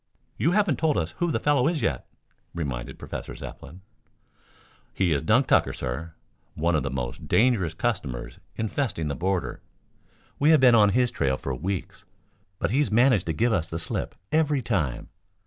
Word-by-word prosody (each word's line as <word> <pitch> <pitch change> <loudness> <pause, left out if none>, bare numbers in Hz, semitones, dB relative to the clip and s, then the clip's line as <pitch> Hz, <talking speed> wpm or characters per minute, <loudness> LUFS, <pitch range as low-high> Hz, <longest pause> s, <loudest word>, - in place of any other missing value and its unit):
"You 165 +5 +1
haven't 200 - +2
told 155 -8 +2
us 80 -1 -1
who 175 - +1
the - - 0
fellow 145 -2 +2
is, 160 -6 -1
yet," 70 - -1 0.5
reminded 65 -8 -4
Professor - - -7
Zepplin. 80 +7 -10 1.1
"He 95 -3 +1
is 70 - 0
Dunk 110 - +3
Tucker, - - +3
sir, 75 +7 -5 0.4
one 85 +3 +1
of 80 - +2
the 65 - -2
most 60 -2 -5
dangerous 110 -9 +2
customers 80 - -3 0.2
infesting 110 - -2
the 70 - -2
border. 90 -8 -2 0.8
We 145 - +4
have 160 -2 +7
been 125 -2 +6
on 105 -3 +6
his 125 +4 +2
trail 65 -1 0
for 70 - -4
weeks, 90 +8 -4 0.5
but - - -1
he's 140 +4 +2
managed 115 -4 +3
to 80 - 0
give 115 +8 +1
us 85 -4 -1
the 80 - -3
slip 80 - -4 0.2
every 150 -4 +2
time. 85 - -1
95 Hz, 170 wpm, -26 LUFS, 80-130 Hz, 1.1 s, have